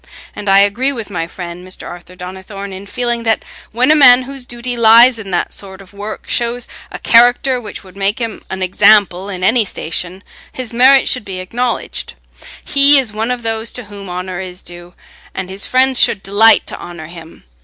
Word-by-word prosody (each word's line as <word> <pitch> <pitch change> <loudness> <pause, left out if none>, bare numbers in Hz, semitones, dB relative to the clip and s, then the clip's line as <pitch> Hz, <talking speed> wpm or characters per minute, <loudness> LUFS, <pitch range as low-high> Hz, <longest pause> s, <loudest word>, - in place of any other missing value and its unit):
And 205 - -5
I 195 0 +6
agree 235 +7 +1
with 225 -6 -6
my 165 -3 -3
friend 175 0 -9
Mr. 185 0 -8
Arthur 175 +1 -11
Donnithorne 190 +2 -9
in 190 +2 -10
feeling 240 +1 -2
that 225 -1 -1 0.3
when 250 +6 +2
a - - +5
man 255 -4 +6
whose 270 -1 -7
duty 245 +1 -5
lies 235 +1 +6
in 200 -3 -8
that 175 -2 -2
sort 190 -1 -8
of 195 0 -16
work 205 +2 -8
shows 240 0 -2 0.2
a - - -6
character 245 +2 +3
which 210 -3 -9
would 185 -1 -16
make 200 +1 -1
him 230 -3 -5
an 190 0 -4
example 195 0 +3
in 185 -2 -6
any 225 +4 +3
station, 180 0 -4 0.3
his 250 -3 -7
merit 265 +3 +5
should 250 - +1
be 190 -2 -7
acknowledged. 235 +6 -4 0.5
He 280 0 +6
is 250 -6 +1
one 220 +2 -3
of 250 -1 -3
those 225 0 -2
to 250 - -7
whom 200 -2 -11
honour 180 0 -5
is 185 -1 -8
due, 175 0 -11 0.4
and 190 -1 -5
his 195 +1 -4
friends 260 0 +3
should 195 - +3
delight 205 +3 +4
to - - -7
honour 170 -2 -9
him. 165 0 -13
205 Hz, 195 wpm, -15 LUFS, 185-245 Hz, 0.5 s, I